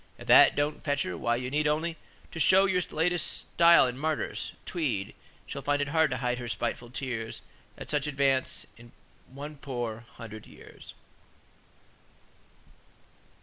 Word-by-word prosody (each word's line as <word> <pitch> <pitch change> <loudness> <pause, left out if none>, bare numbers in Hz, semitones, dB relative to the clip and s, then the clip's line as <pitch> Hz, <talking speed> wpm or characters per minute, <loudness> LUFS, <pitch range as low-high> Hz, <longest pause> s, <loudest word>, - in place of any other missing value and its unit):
If - - -11
that - - +7
don't 145 +1 -1
fetch 145 -2 0
her, 90 - -4
why, 120 +7 0
you 125 +1 -4
need 150 +1 +1
only 160 +2 0 0.4
To 165 - -6
show 190 +4 +6
your 185 -2 +1
latest 175 +2 0
style 170 -3 +7
in 125 0 -4
martyrs, 155 0 -2
Tweed: 135 - -2 0.3
She'll 140 - -6
find 145 +1 0
it 145 -1 -1
hard 160 0 +3
to 125 - -2
hide 125 0 -1
her 120 - -6
spiteful 120 +1 -3
tears 120 -3 -5 0.3
At - - -6
such 150 0 0
advance 135 -2 0
in 120 0 -16 0.3
one 145 +3 -9
poor 120 -4 -5
hundred 110 -2 -9
years." - - -14
140 Hz, 150 wpm, -28 LUFS, 120-155 Hz, 0.4 s, that